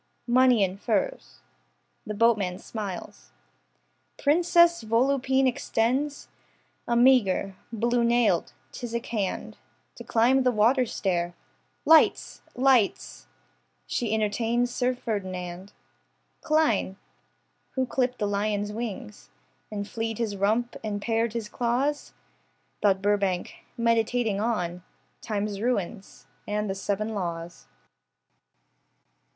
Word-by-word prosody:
Money 250 -2 +4
in 190 0 -1
furs. 210 - -2 0.7
The 215 - -4
boatman 205 -5 +2
smiles, 190 - -7 0.9
Princess 340 +1 +4
Volupine 265 +4 +2
extends 255 +4 -1 0.6
A 235 - +1
meagre, 235 -6 +3 0.2
blue 235 +2 +1
nailed, 235 -7 +2 0.2
phthisic 235 0 -4
hand 200 - -3 0.4
To - - -8
climb 245 +4 +3
the 255 -1 +3
waterstair. 210 -7 +1 0.5
Lights, 320 0 +4
lights, 250 - +1 0.6
She 225 - -2
entertains 225 +3 0
Sir 250 0 0
Ferdinand 185 -5 -5 0.7
Klein. 300 -11 +1 0.8
Who 260 -1 +1
clipped 250 0 -1
the 210 - -1
lion's 205 0 -1
wings 200 - -6 0.4
And 205 -1 -5
flea'd 225 -1 -3
his 220 -4 -2
rump 220 +5 0
and 210 -2 -3
pared 225 +1 0
his 230 -3 -3
claws? 250 +6 -1 0.7
Thought 195 -1 +2
Burbank, 200 -3 0 0.2
meditating 230 -2 +1
on 180 -6 -2 0.4
Time's 205 -2 -3
ruins, 215 -4 -3 0.2
and 210 0 -1
the 195 - -1
seven 200 +2 -2
laws. 170 -3 -5
225 Hz, 100 wpm, -26 LUFS, 200-245 Hz, 0.9 s, Money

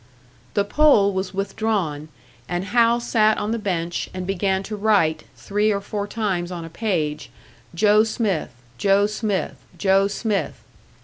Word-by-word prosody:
The 200 - +3
pole 205 -4 +4
was 190 0 -2
withdrawn, 195 -6 -2 0.4
and 175 +2 -2
Hal 235 +3 +3
sat 220 -2 +2
on 210 - -2
the 230 - -1
bench, 175 -5 -2
and 185 -1 -4
began 190 0 0
to 210 +2 -5
write, 200 -7 +2
three 210 +2 0
or 200 - 0
four 205 0 -4
times 190 -5 -2
on 170 -2 -5
a - - -9
page, 160 -7 -2 0.5
"Joe 210 +3 +5
Smith 215 -6 -1 0.3
Joe 200 0 +4
Smith 205 -8 -2 0.2
Joe 195 +2 +3
Smith." 205 0 -2
200 Hz, 145 wpm, -22 LUFS, 185-215 Hz, 0.5 s, Joe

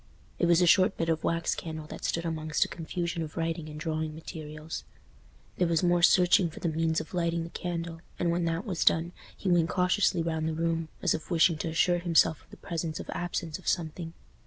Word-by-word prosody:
It 175 - +3
was 170 +1 +5
a - - +5
short 185 +2 +5
bit 165 - -1
of 160 -1 0
wax 165 0 +1
candle 160 -2 -6
that - - -9
stood 170 0 -1
amongst 155 -2 0
a - - -6
confusion 170 +1 -3
of 155 +1 -6
writing 165 -1 -2
and 150 0 -8
drawing 155 -1 -2
materials. 155 -1 -7 0.7
There 180 - +2
was 165 0 +1
more 175 0 +3
searching 175 0 +5
for 160 - -10
the 170 - -1
means 160 0 +1
of - - -8
lighting 170 -1 0
the 165 - -8
candle, 170 -2 -4 0.2
and 170 -1 +1
when 170 0 0
that 165 +3 -1
was 185 -6 -1
done, 165 +2 +3 0.3
he - - -5
went 170 -1 +3
cautiously 180 -1 +2
round 160 -1 -1
the 160 - -3
room, 165 0 -1 0.2
as - - +3
if 155 - -5
wishing 165 -2 +3
to - - -2
assure 175 +2 +2
himself 165 -2 +3
of - - -27
the - - -13
presence 165 -2 -4
or - - -6
absence 170 -2 -3
of 185 - -14
something. 165 -1 -2
165 Hz, 220 wpm, -29 LUFS, 160-175 Hz, 0.7 s, was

